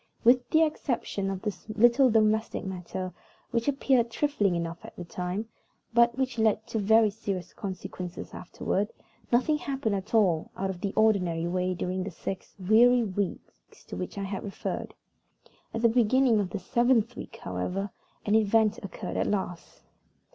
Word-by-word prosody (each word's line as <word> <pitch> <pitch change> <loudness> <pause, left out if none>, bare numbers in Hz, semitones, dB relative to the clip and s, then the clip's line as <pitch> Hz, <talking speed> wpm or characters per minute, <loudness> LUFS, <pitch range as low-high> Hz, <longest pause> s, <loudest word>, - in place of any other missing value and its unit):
With 245 +1 +5
the 320 +1 +5
exception 245 -10 -1
of 195 0 -4
this 210 -1 -5
little 240 +5 +5
domestic 220 -1 +2
matter, 185 -1 -5 0.4
which 235 0 0
appeared 265 -4 +2
trifling 230 -7 +1
enough 170 0 -4
at - - -11
the 175 - -7
time, 180 +5 -4 0.5
but 235 +1 +4
which 260 -3 -1
led 220 -1 +2
to 220 - -1
very 220 +1 +4
serious 195 -4 -5
consequences 185 -3 -6
afterward, 195 +3 -2 0.4
nothing 260 +6 +3
happened 270 -7 -2
at 200 +3 -3
all 180 -8 +3
out 190 0 -1
of 180 -2 -9
the 200 - -1
ordinary 180 -7 +2
way 180 +1 0
during 185 +1 -2
the 195 - -4
six 185 +2 -6
weary 230 +6 +5
weeks 200 -2 -5
to - - -5
which 180 - -5
I 200 - -2
have 195 0 -4
referred. 200 - -5 0.8
At 225 - -4
the - - +8
beginning 240 0 +4
of 195 -3 -1
the 195 - -3
seventh 235 +3 +2
week, - - -8
however, 180 - -3 0.3
an 205 - +1
event 220 0 +3
occurred 195 - -5
at - - +1
last. 190 -4 -4
210 Hz, 160 wpm, -28 LUFS, 185-235 Hz, 0.8 s, the